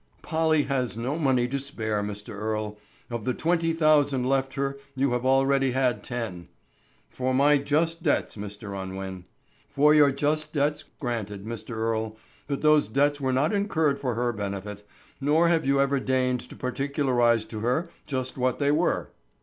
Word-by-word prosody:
"Polly 160 -2 +2
has 130 -5 -1
no 125 +5 -2
money 130 -6 +2
to 140 +2 -2
spare, 110 -7 -2
Mr. 105 0 -5
Earle. 105 0 -3 0.3
Of 120 -2 -3
the 125 +3 -1
twenty 165 0 +1
thousand 145 -5 +3
left 135 0 0
her 140 0 -2 0.2
you 135 0 +1
have 125 +1 0
already 135 0 +3
had 130 -2 +1
ten——" 115 -8 -5 0.6
"For 130 0 -1
my 145 +2 +5
just 160 +4 0
debts, 155 -4 0
Mr. 105 0 -7
Unwin." 95 -1 -6 0.4
"For 150 +2 +4
your 150 -2 +6
just 155 +2 -1
debts, 145 0 0 0.2
granted, 105 -6 -4
Mr. 115 0 -6
Earle, 110 -1 -1 0.3
but 140 0 -3
those 150 -5 +5
debts 145 +5 +1
were 130 -1 +1
not 140 +7 +1
incurred 160 -8 +1
for 125 -4 -2
her 120 0 0
benefit, 100 0 -5 0.4
nor 155 +4 +3
have 165 -4 +1
you 140 0 +3
ever 140 0 +2
deigned 130 -1 +1
to - - -10
particularize 125 -4 +1
to 110 -1 -7
her 130 +10 0 0.2
just 130 -2 -3
what 125 0 +1
they 140 0 +2
were." 160 +4 0
130 Hz, 165 wpm, -26 LUFS, 115-145 Hz, 0.6 s, your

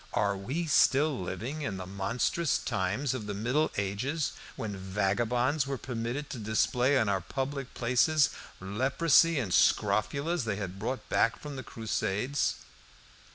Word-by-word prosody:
Are 100 -1 +1
we 130 - -3
still 145 -1 +3
living 115 - -4
in 105 -10 -3
the 90 - -6
monstrous 115 - 0
times 105 +8 -1
of 115 -5 -5
the 105 - -3
Middle 125 +9 +1
Ages, 110 +11 -1 0.2
when 105 -3 -4
vagabonds 115 +9 0
were 135 -1 -2
permitted 120 +4 -4
to 125 - -5
display 120 +5 +2
in 110 - +2
our 95 -2 +1
public 135 +6 -4
places 130 +5 +3 0.3
leprosy 140 - +3
and 115 -9 -1
scrofulas 140 +8 +2
they 105 -3 -1
had 95 -2 -5
brought 125 +5 -3
back 115 - +2
from 145 -1 -7
the 130 - -5
Crusades?" 115 +3 -1
120 Hz, 145 wpm, -30 LUFS, 100-140 Hz, 0.3 s, still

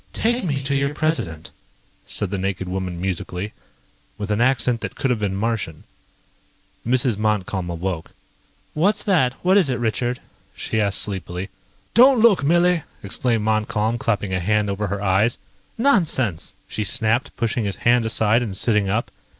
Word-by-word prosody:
"Take 240 +2 0
me 140 -6 -1
to 135 +1 -1
your 140 +1 0
President," 120 - -2 0.6
said 100 -3 -3
the 100 - -2
naked 95 -1 -2
woman 90 -1 -3
musically, 95 +2 -3 0.6
with 105 0 -4
an 105 +2 +1
accent 120 -2 +2
that - - -5
could 135 - 0
have 120 - 0
been 100 -2 -1
Martian. 100 -7 -2 1.0
Mrs. 120 -2 +2
Montcalm 100 -4 -1
awoke. 85 -1 -3 0.6
"What's 190 +8 +1
that? 160 -11 +2
What 190 +2 +5
is 180 -8 +3
it, 125 - 0
Richard?" 120 +1 -1 0.4
she 110 - -1
asked 100 -1 +2
sleepily. 95 -1 -5 0.4
"Don't 255 +2 +7
look, 220 -9 +5
Millie!" 175 +3 +3 0.2
exclaimed 115 +2 0
Montcalm, 110 +1 0
clapping 105 -4 -1
a 95 - +1
hand 105 +2 +1
over 105 +1 -2
her 100 +1 -3
eyes. 100 +4 +2 0.4
"Nonsense!" 165 - +1
she 110 - -3
snapped, 115 +3 0
pushing 115 -1 -1
his 100 - -2
hand 120 0 +5
aside 110 +1 +3
and 105 -5 -3
sitting 105 -3 +2
up. 110 +4 -1
110 Hz, 160 wpm, -22 LUFS, 100-130 Hz, 1.0 s, Don't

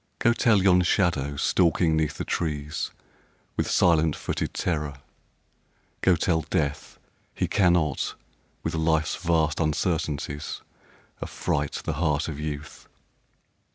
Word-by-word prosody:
Go 120 - +3
tell 110 -5 +3
yon 90 -2 +5
shadow 85 -6 +1
stalking 85 +1 +2
'neath 80 -1 0
the - - -3
trees 75 -3 -2 0.7
With - - -1
silent 80 -3 +3
footed - - -3
terror, 75 -4 -1 1.1
go 90 - +4
tell 85 -1 +1
Death 70 0 -2 0.4
He - - 0
cannot 85 -7 +2 0.5
with - - -2
Life's 80 -1 +1
vast 80 -3 +1
uncertainties 75 -2 -2 0.6
Affright 75 -1 -2
the - - -1
heart 75 -2 +1
of 75 -3 -5
Youth 75 -1 -6
80 Hz, 115 wpm, -26 LUFS, 75-85 Hz, 1.1 s, yon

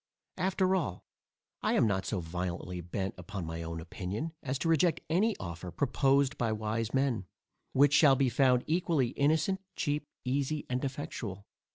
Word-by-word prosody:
After 190 0 +2
all, 140 - -2 0.6
I - - +1
am - - +4
not 95 -3 0
so 100 -5 -1
violently 90 +1 -4
bent 95 +3 -3
upon 90 0 -5
my 80 +1 -4
own 85 0 -4
opinion, 100 - -4
as 135 -2 -2
to 165 - -2
reject 165 0 +3
any 210 +6 +2
offer, 85 0 -6
proposed 140 - +2
by 115 -2 +1
wise 110 +1 -2
men, 130 -8 0 0.5
which 140 +1 +5
shall 145 -2 +7
be 135 0 +2
found 125 0 +3
equally 160 -6 +1
innocent, 160 +8 +1
cheap, 145 -1 -1 0.2
easy, 140 +3 -1
and 125 +2 -1
effectual. 130 -8 -4
130 Hz, 160 wpm, -31 LUFS, 95-145 Hz, 0.6 s, shall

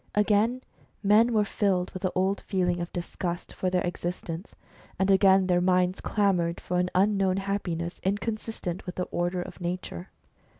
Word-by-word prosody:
Again 215 +4 +2 0.4
men 215 +4 +5
were 215 -2 +3
filled 195 -3 0
with 185 - -7
the 185 -1 0
old 190 +2 +1
feeling 180 -3 +1
of 170 - -5
disgust 175 0 -4
for 185 - -1
their 180 0 +1
exist 175 0 -4
ence, 165 +4 -7 0.4
and 190 +1 +2
again 190 0 +5
their 180 -1 +2
minds 180 0 +2
clamoured 180 -5 +1
for 180 0 -1
an 180 0 +1
unknown 195 -1 +3
happiness, 180 -4 -3
inconsistent 205 -2 -3
with 180 - -5
the 180 - -1
order 175 +1 -1
of - - -11
nature. 175 - -4
185 Hz, 165 wpm, -27 LUFS, 180-200 Hz, 0.4 s, men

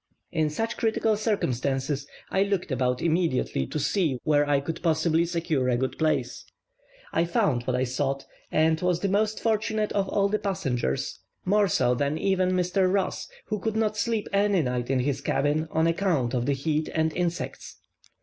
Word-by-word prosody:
In 155 -3 +1
such 225 +9 -3
critical 220 -1 +1
circumstances 140 - -1 0.2
I 190 - +2
looked 200 -5 0
about 125 -1 0
immediately 160 - +1
to - - -4
see 150 -1 +1
where 145 -1 +2
I 145 -1 +4
could 160 +4 -5
possibly 165 0 +2
secure 165 -6 0
a 120 - +2
good 130 +1 -2
place. 145 -6 0 0.7
I 165 - +3
found 150 -7 +1
what 130 - +1
I 125 - +1
sought, 135 +2 -2 0.3
and 160 0 +2
was 180 -1 +1
the 200 - +1
most 210 +2 +1
fortunate 220 -1 0
of 195 -2 0
all 200 -1 +2
the 210 +1 0
passengers, 135 - -2 0.3
more 205 +2 +3
so 125 -8 +2
than 140 +4 0
even 185 +1 +1
Mr. 185 +1 +2
Ross, 195 0 -1 0.2
who 215 -1 -2
could 220 +2 -2
not 215 -1 +1
sleep 215 0 -1
any 200 -3 +3
night 125 -1 -2
in 135 -2 +2
his 140 +1 -1
cabin 145 +3 0
on 160 +1 +1
account 165 -8 +1
of 120 -1 0
the 140 - +3
heat 155 +3 -1
and 160 0 +1
insects. 175 -1 -3
160 Hz, 180 wpm, -26 LUFS, 135-195 Hz, 0.7 s, I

